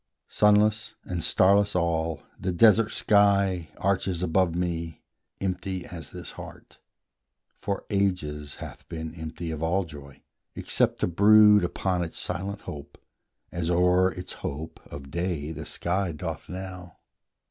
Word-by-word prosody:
Sunless 105 +1 +3
and 90 -3 -4
starless 100 +1 +3
all, 80 -3 0 0.2
the 95 - -1
desert 110 +4 +5
sky 100 -6 +3
Arches 95 -2 0
above 90 0 +2
me, 85 -2 -3 0.4
empty 95 -1 -3
as 85 -5 -9
this - - -9
heart - - -12 0.7
For 100 -1 -4
ages 80 -8 -1
hath - - -10
been 80 -1 -5
empty 80 0 -6
of 80 -1 -5
all 85 +4 +1
joy, 70 -4 -12 0.3
Except - - 0
to - - +2
brood 105 +3 +6
upon 90 0 -1
its 85 - -6
silent 100 +4 -3
hope, 70 -2 -9 0.5
As 85 -1 -2
o'er 90 +1 +4
its 90 -1 -7
hope 80 +4 -5
of 70 -2 -9
day 85 -3 -2
the - - -7
sky 90 +1 -1
doth 80 +1 -6
now. 90 -2 -8
90 Hz, 135 wpm, -26 LUFS, 80-100 Hz, 0.7 s, brood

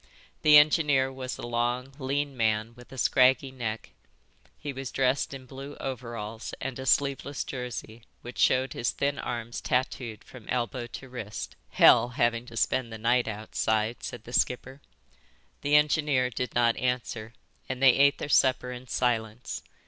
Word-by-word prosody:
The 150 -1 +8
engineer 150 -3 +4
was 130 -1 -5
a - - -6
long, 120 +2 -1
lean 140 +1 -1
man 110 -1 0
with 125 +1 -16
a 135 - -10
scraggy 130 +2 +4
neck. 115 -4 -5 0.7
He 145 - -5
was 135 0 -5
dressed 135 +1 +1
in 135 -1 -8
blue 135 +2 -9
overalls 115 -4 -6
and 130 -1 -5
a 130 - -5
sleeveless 140 0 +1
jersey 125 -3 -6 0.2
which 120 - -8
showed 130 +1 +3
his 120 - -1
thin 140 0 -1
arms 120 -1 -4
tatooed 125 -3 -2
from 125 -5 -14
elbow 120 0 -2
to 135 - -9
wrist. 115 -5 -6
"Hell, - - +6
having 120 0 +1
to 115 - -10
spend 120 +1 0
the 110 - -6
night 120 +2 +2
outside," 110 +1 -1
said - - -7
the 120 - -11
skipper. 130 +3 0 0.8
The 145 +1 +2
engineer 150 -4 +3
did 125 +2 -4
not 120 -1 +3
answer, 125 -3 -2 0.4
and 130 -1 -3
they 135 -2 +7
ate 140 +2 +4
their - - -4
supper 130 -3 +3
in 125 +1 -8
silence. 120 -2 -1
125 Hz, 160 wpm, -28 LUFS, 115-135 Hz, 0.8 s, The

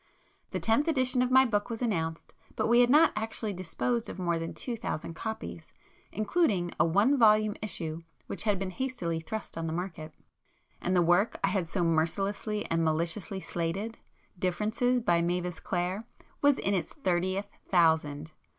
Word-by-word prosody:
The - - -3
Tenth 230 +8 +2
Edition 255 -5 +2
of 250 - +2
my 260 +1 +6
book 210 -2 0
was 230 -1 -4
announced, 165 -9 -2 0.2
but - - 0
we 235 +1 +5
had 245 0 +5
not 300 +5 +6
actually 220 -1 -2
disposed 225 +6 -2
of - - -7
more 170 -2 0
than 165 0 -4
two 245 - -4
thousand 190 -7 -4
copies, 125 - -6 0.4
including 210 - +1
a - - +5
One 215 - +3
Volume 215 -2 +5
issue 165 -6 -4 0.2
which - - -5
had 210 -3 +1
been 190 0 -3
hastily 185 -9 -2
thrust 205 +1 -6
on 165 - -2
the 160 - -2
market. 165 -3 -5 0.7
And 185 - 0
the 175 - +5
work 175 +6 +2
I 195 - +3
had 190 -4 -1
so 180 +1 0
mercilessly 195 +6 0
and 165 0 +2
maliciously 170 +5 -1
slated,—'Differences' 205 +5 -2
by 175 -7 +2
Mavis 175 0 -1
Clare 185 +5 -2 0.3
was 285 -1 +5
in 200 - 0
its 180 -5 -1
thirtieth 185 - 0 0.2
thousand! 160 -4 +2
195 Hz, 165 wpm, -29 LUFS, 170-225 Hz, 0.7 s, my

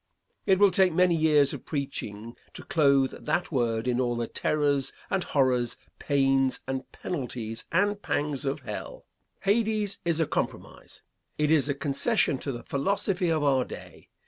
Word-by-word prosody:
It 190 - +5
will 200 0 +5
take 185 0 +4
many 180 0 +4
years 150 -3 +3
of - - -7
preaching 115 -6 -5 0.2
to - - -8
clothe 140 -4 +3
that 175 +2 -1
word 115 -4 0
in 125 0 +1
all 120 -1 0
the 120 0 -1
terrors 145 0 0 0.2
and 190 -2 +1
horrors, 125 -4 +1 0.2
pains, 135 -2 +2
and 130 0 -4
penalties 120 -8 -5
and 205 +4 +1
pangs 145 -5 -2
of 140 +1 -2
hell. 105 -5 -7 0.4
Hades 210 -1 +1
is 170 -1 0
a 160 - +3
compromise. - - -5 0.3
It 150 0 +1
is 150 -3 +3
a 140 - 0
concession 140 - +1
to 140 - -4
the 120 -2 -7
philosophy 190 +4 0
of 155 -2 +1
our 135 -3 +3
day. - - -11
145 Hz, 160 wpm, -27 LUFS, 130-175 Hz, 0.4 s, It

